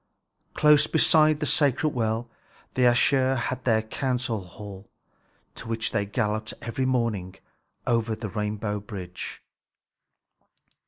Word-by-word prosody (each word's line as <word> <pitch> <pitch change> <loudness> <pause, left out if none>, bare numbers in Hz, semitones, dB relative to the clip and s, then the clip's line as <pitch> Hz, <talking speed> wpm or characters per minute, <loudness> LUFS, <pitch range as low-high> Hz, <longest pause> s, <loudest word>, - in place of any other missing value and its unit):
Close 150 0 +5
beside 155 -1 +4
this 150 - +1
sacred 145 +1 +2
well 115 0 -1 0.5
the 130 - -1
Æsir 130 +2 +4
had 125 +1 -3
their 110 -3 +3
council 125 -1 -2
hall, 100 +2 -11 0.6
to - - -9
which 115 -1 -2
they 100 -2 -1
galloped 110 0 -2
every 115 +3 -3
morning 110 -8 -1 0.5
over 115 -2 +1
the 110 -1 -6
rainbow 105 0 -2
bridge. 95 -3 -7
115 Hz, 115 wpm, -26 LUFS, 105-130 Hz, 0.6 s, Close